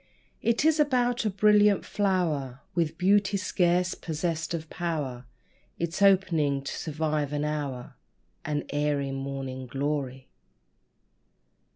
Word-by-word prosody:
It 235 +5 +1
is 315 -1 +4
about 245 -5 +2
a - - +3
brilliant 210 0 +4
flower, 160 -10 -1
With 165 -4 0
beauty 200 +2 +3
scarce 180 -1 +1
possessed 160 0 -3
of 160 -1 -6
power 145 -8 -3 0.5
Its 170 +3 -3
opening 165 -8 +3
to 140 - -4
survive 155 -2 -2
an 145 0 -1
hour 145 -5 -4 0.5
An 145 -1 -2
airy 145 -1 0
Morning 135 -1 -5
Glory. 135 0 -3
160 Hz, 110 wpm, -27 LUFS, 140-190 Hz, 0.5 s, is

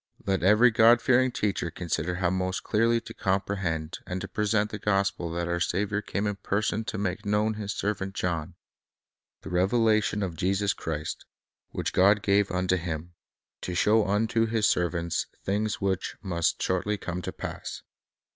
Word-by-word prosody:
Let 95 -1 +1
every 105 +7 +6
God 115 +1 +6
fearing 130 +1 +3
teacher 100 -6 -1
consider 85 0 -2
how 90 -1 0
most 95 0 -1
clearly 115 +2 +2
to - - -10
com 95 0 0
prehend 85 -5 -3
and 90 +1 -3
to 95 - -4
present 105 +1 0
the 105 - -5
gospel 100 -4 0
that 85 0 -2
our 85 0 -1
Saviour 100 +3 0
came 100 0 -3
in 105 -1 -1
person 105 +2 -1
to 110 - -4
make 95 -2 -2
known 105 +2 +1
to 105 - -8
His 100 -1 -3
servant 95 -1 -3
John, 85 -1 -2 0.4
— - - -67
"The - - -7
Revelation 105 +3 +2
of 90 -4 -3
Jesus 95 +2 +1
Christ, 80 -1 -5 0.4
which - - -3
God 100 +3 +4
gave 100 0 +3
unto 90 0 +1
Him, 85 0 -5 0.5
to 90 - -4
show 105 +4 +4
unto 110 +3 +1
His 110 -1 +1
servants 85 -1 0 0.2
things 105 +2 -1
which 95 -2 -1
must 85 -4 0
shortly 100 +3 0
come 90 -1 -4
to - - -4
pass." - - -6
100 Hz, 175 wpm, -27 LUFS, 90-105 Hz, 0.5 s, every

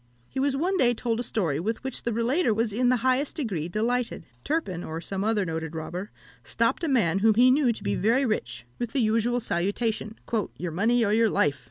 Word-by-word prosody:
He 265 - -5
was 270 0 +1
one 370 +6 0
day 245 -6 +4
told 230 0 -1
a - - -1
story 170 - -1
with 220 +8 -3
which 265 - -3
the 235 - -2
relator 235 +3 +1
was 225 -1 0
in 245 +3 +2
the 255 - +4
highest 260 +2 +1
degree 195 - -2
delighted. 230 -1 -1 0.2
Turpin, 200 - -2
or 160 +1 -5
some 190 +3 -3
other 215 -2 +1
noted 160 -1 -4
robber, 175 +5 -5 0.3
stopped - - 0
a - - +1
man 200 - +2
whom 220 +1 +4
he 250 +3 +6
knew 265 -2 +3
to 225 - -6
be 100 - 0
very 230 - +2
rich, 125 - -3
with 240 -2 -3
the 280 - +1
usual 230 +1 +2
salutation 215 +2 -2 0.4
"Your 175 -1 -4
money 225 +7 +2
or 205 - +1
your 225 0 +4
life!" 145 -7 +1
225 Hz, 215 wpm, -26 LUFS, 185-245 Hz, 0.4 s, he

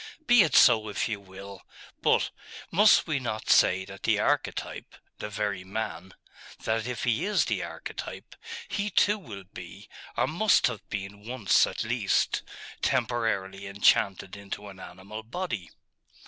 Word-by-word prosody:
'Be 245 -5 +7
it 165 - +2
so 110 -3 +6
if 100 - -1
you 105 -3 -3
will. 100 0 -11 0.4
But - - +2 0.4
must 210 +4 +6
we 155 -4 -1
not 110 -4 -2
say 95 +1 +4
that 95 -1 -11
the - - +2
archetype - - -2 0.2
the - - -5
very 100 -2 -2
man 95 -2 -5 0.5
that 110 +1 -1
if 125 -2 -4
he 115 -3 +1
is 210 0 +2
the - - -1
archetype, - - -8 0.3
he 205 +1 -2
too 205 +2 +3
will 105 - -9
be, 95 - -11 0.3
or - - +3
must 200 +6 +3
have 120 -4 -1
been, 100 +1 -6
once 120 -7 +3
at - - -4
least, - - +1 0.4
temporarily 100 -5 -1
enchanted 100 -1 +2
into 100 0 -7
an 95 -1 -12
animal 95 +4 -9
body?.... 115 - -5
105 Hz, 145 wpm, -27 LUFS, 100-125 Hz, 0.5 s, Be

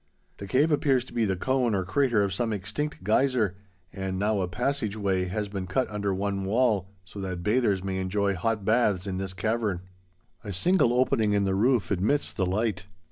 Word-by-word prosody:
The 100 - -7
Cave 140 +10 +3
appears 135 -4 +2
to - - -14
be 115 -2 +1
the 95 -2 0
cone 125 +2 +1
or 95 -2 -1
crater 120 0 +2
of 100 -2 -1
some 115 +2 -1
extinct 110 +8 -4
geyser, 110 -2 +2 0.4
and 95 -1 -3
now 105 +1 +1
a 90 - -1
passage 120 +2 -2
way 95 -3 0
has 105 +3 -3
been 95 -2 -5
cut 110 +8 0
under 100 -1 -1
one 100 +1 -2
wall, 105 -2 +1 0.2
so 100 +3 -9
that 90 -2 -4
bathers 105 -3 +1
may 95 -1 -2
enjoy 100 +1 0
hot 110 +2 -1
baths 105 -4 +2
in 95 -2 -3
this 95 -1 -5
cavern. 110 -3 -1 0.6
A 105 - -5
single 170 - +3
opening 120 -4 +2
in 100 -1 +2
the 95 -1 +1
roof 110 -1 +2
admits 105 +10 +1
the 95 -3 0
light. 100 -1 -1
105 Hz, 195 wpm, -27 LUFS, 95-120 Hz, 0.6 s, Cave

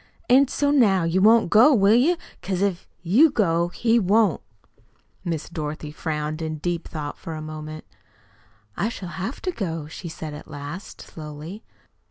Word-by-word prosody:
"An' 265 +3 +6
so 285 +2 0
now 205 -10 +4
you 170 +3 +1
won't 225 -2 +5
go, 250 +7 +7
will 200 -1 +5
you? 290 +10 +4 0.2
Because 190 0 -1
if 195 -3 -1 0.2
you 230 - +5
go, 170 - +1
he 230 +6 +2
won't." 205 -1 +3 0.8
Miss 165 -3 -3
Dorothy 155 -2 -5
frowned 155 0 -3
in 160 -1 -3
deep 170 +2 -3
thought 150 -2 -6
for 165 - -6
a - - -5
moment. 155 0 -7 0.9
"I 210 - 0
shall 190 -6 -7
have 190 +9 -5
to 370 - 0
go," 165 - -4
she 165 +3 -8
said 160 -1 -7
at 150 - -10
last, 145 +6 -8
slowly. 155 +6 -9
175 Hz, 165 wpm, -24 LUFS, 155-220 Hz, 0.9 s, go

